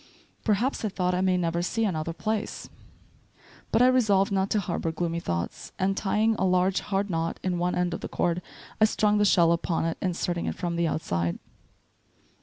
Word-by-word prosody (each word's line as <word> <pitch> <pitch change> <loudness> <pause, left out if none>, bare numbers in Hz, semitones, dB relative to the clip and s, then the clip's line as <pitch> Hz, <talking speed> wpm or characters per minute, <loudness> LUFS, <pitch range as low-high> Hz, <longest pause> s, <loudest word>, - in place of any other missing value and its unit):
"Perhaps," 230 +6 0
I 215 - 0
thought, 180 -2 -1
"I 180 - +1
may 185 -1 +2
never 170 -1 0
see 225 +5 0
any 190 -5 0
other 155 +1 -2
place." 215 +5 -3 1.0
But 240 - +4
I - - +7
resolved 215 -6 +3
not 195 0 +1
to 215 - +2
harbor 170 -3 -2
gloomy 170 +1 -2
thoughts; 85 - -4
and 195 0 +1
tying 215 +3 +1
a - - +1
large 185 0 +2
hard 200 0 -1
knot 165 0 -2
in 180 -2 -1
one 180 +1 0
end 180 -1 0
of - - -5
the - - -5
cord, 175 0 0 0.4
I - - +9
strung 210 -1 +2
the 205 - +4
shell 170 -4 +5
upon 170 -1 0
it, 165 - -2
inserting 175 -1 -1
it - - -2
from 175 -2 -3
the 170 0 +1
outside. 85 - -1
180 Hz, 200 wpm, -27 LUFS, 170-205 Hz, 1.0 s, I